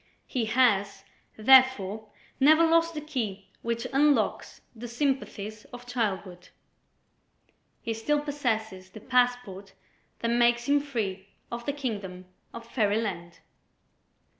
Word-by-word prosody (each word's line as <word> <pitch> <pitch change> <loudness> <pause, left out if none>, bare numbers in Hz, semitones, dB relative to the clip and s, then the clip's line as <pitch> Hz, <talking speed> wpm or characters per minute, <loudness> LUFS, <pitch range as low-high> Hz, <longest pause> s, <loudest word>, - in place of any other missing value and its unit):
He 245 -3 -2
has, 205 -5 +2 0.3
therefore, 220 -4 +4 0.3
never 310 +4 +6
lost 330 0 +2
the 300 - -4
key 215 -10 -4
which 235 0 -3
unlocks 290 +1 +1
the 235 +2 -8
sympathies 235 -5 -3
of 245 0 -12
childhood; 200 -7 -3 1.3
he 230 - -2
still 290 +7 0
possesses 220 -10 -3
the 205 - -11
passport 245 -5 0 0.4
that 230 - -2
makes 240 0 +2
him 285 +2 +3
free 210 -9 -4 0.2
of 235 0 -6
the 285 - 0
kingdom 200 -10 -5 0.3
of 230 0 -9
Fairyland. 205 -7 -2
235 Hz, 115 wpm, -27 LUFS, 200-265 Hz, 1.3 s, never